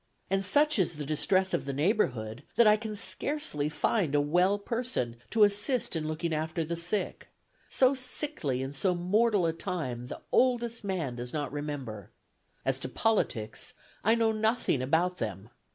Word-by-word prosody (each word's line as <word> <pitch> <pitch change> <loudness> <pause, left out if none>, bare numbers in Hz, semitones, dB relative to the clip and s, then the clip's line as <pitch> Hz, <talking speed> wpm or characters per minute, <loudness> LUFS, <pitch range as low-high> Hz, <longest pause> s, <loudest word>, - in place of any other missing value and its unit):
And 195 0 +2
such 290 +7 +3
is 175 -2 +1
the 150 -2 -6
distress 185 +6 +1
of - - 0
the 140 - -3
neighborhood 135 - 0
that 235 - +6
I 210 0 +7
can 215 0 -5
scarcely 190 - 0
find 150 +1 0
a - - +5
well 180 +7 +3
person 225 - -2
to 220 - +4
assist 210 +3 +2
in 155 -1 -2
looking 155 +1 -2
after 160 +2 -1
the 170 +2 -3
sick.... 175 +5 -2 0.4
So 260 +1 +4
sickly 255 - -1
and 135 +1 -5
so 180 +6 +1
mortal 200 +2 +2
a 165 - +1
time 155 -10 -4
the - - -7
oldest 240 -2 +2
man 170 -11 -2
does 120 0 -4
not 145 -4 -2
remember.... 135 - -5 0.6
As - - 0
to - - -3
politics, 200 - -1 0.3
I 225 +2 +4
know 225 -1 +2
nothing 220 - +1
about 170 +7 +1
them. 105 -1 -5
180 Hz, 170 wpm, -29 LUFS, 145-220 Hz, 0.6 s, I